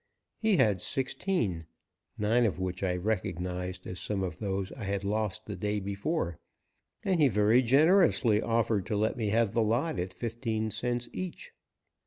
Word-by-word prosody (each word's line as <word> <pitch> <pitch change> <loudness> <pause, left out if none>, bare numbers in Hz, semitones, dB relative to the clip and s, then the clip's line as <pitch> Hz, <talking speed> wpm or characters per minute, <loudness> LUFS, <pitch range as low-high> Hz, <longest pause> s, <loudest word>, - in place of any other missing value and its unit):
He 215 -4 +3
had 105 - +3
sixteen, 130 - -2 0.5
nine 110 +4 +2
of 95 - -2
which 95 -1 -3
I 90 -2 0
recognized 90 -2 -3
as 90 0 -5
some 100 -2 -2
of 85 -4 -4
those 95 -2 -2
I 115 - -7
had 100 0 -2
lost 110 +1 -1
the 105 - -5
day 105 0 -1
before, 100 - -2 0.6
and 185 -3 +1
he 150 - +6
very 110 +1 +4
generously 140 - +4
offered 115 -3 +1
to 105 - -1
let 110 +1 +1
me 110 -4 -2
have 110 0 +2
the 115 - +2
lot 115 - 0
at 90 +1 -2
fifteen 110 0 -3
cents 120 +2 -1
each. 185 - -6
110 Hz, 165 wpm, -30 LUFS, 95-120 Hz, 0.6 s, he